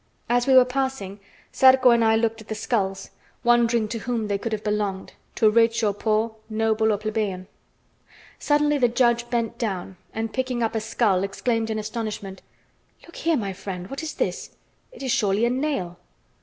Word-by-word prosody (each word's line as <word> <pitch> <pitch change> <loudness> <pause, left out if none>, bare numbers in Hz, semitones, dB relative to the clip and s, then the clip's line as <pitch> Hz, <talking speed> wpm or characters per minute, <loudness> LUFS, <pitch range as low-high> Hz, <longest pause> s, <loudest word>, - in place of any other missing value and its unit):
As 245 +1 +1
we 265 - +5
were 255 -1 +8
passing, 255 -6 -3 0.3
Zarco 260 -1 +6
and 235 -1 +4
I 220 0 +4
looked 225 0 0
at 220 - -15
the 220 - -4
skulls, 195 -3 -2 0.3
wondering 235 -2 +3
to 230 0 -4
whom 230 -1 -3
they 200 -1 0
could 230 - -4
have 215 -1 -3
belonged, 205 -2 -2 0.2
to 220 - +3
rich 230 +1 +3
or 205 -2 +2
poor, 220 +2 -1
noble 220 0 +1
or 210 - +1
plebeian. 210 -3 -3 0.9
Suddenly 295 0 +2
the 245 - +4
judge 240 0 +1
bent 230 -2 -2
down, 190 -4 -3
and 225 0 -4
picking 255 -2 -1
up 225 - -1
a 220 - -1
skull, 215 -4 +1
exclaimed 225 +3 -1
in 220 - -2
astonishment: 215 -3 -5 0.6
"Look 340 - -16
here, 330 -2 +1
my 200 -5 -3
friend, 185 0 -7
what 275 - -4
is 320 -1 -5
this? - - -2 0.4
It - - -11
is 260 - -1
surely 205 +1 +2
a 240 - +1
nail!" 255 - -2
225 Hz, 185 wpm, -24 LUFS, 210-240 Hz, 0.9 s, were